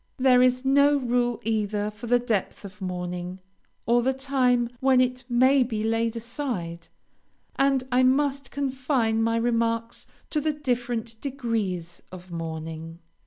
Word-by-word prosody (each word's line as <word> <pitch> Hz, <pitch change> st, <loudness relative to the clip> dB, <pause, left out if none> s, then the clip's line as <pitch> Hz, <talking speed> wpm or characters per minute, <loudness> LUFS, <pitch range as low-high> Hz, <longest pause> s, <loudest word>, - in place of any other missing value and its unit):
There 255 Hz, -1 st, +5 dB
is 255 Hz, +1 st, +3 dB
no 280 Hz, +2 st, +5 dB
rule 245 Hz, -2 st, 0 dB
either 210 Hz, -1 st, -1 dB
for 220 Hz, +3 st, -9 dB
the 245 Hz, +1 st, +4 dB
depth 225 Hz, -4 st, -2 dB
of 195 Hz, +1 st, -11 dB
mourning, 180 Hz, 0 st, -4 dB, 0.5 s
or 240 Hz, +1 st, +3 dB
the 260 Hz, +2 st, +1 dB
time 260 Hz, -3 st, +1 dB
when 265 Hz, -1 st, +4 dB
it 255 Hz, 0 st, +1 dB
may 260 Hz, +3 st, +4 dB
be 225 Hz, -4 st, -1 dB
laid 225 Hz, +1 st, 0 dB
aside, 230 Hz, -, -4 dB, 0.7 s
and 275 Hz, -1 st, +2 dB
I 250 Hz, +1 st, +4 dB
must 275 Hz, +1 st, +2 dB
confine 260 Hz, -5 st, 0 dB
my 230 Hz, 0 st, +1 dB
remarks 230 Hz, 0 st, -1 dB, 0.2 s
to 305 Hz, -, +1 dB
the 305 Hz, +1 st, 0 dB
different 240 Hz, -5 st, -3 dB
degrees 220 Hz, -, -3 dB
of 185 Hz, -1 st, -11 dB
mourning. 165 Hz, 0 st, -6 dB
240 Hz, 140 wpm, -25 LUFS, 210-260 Hz, 0.7 s, There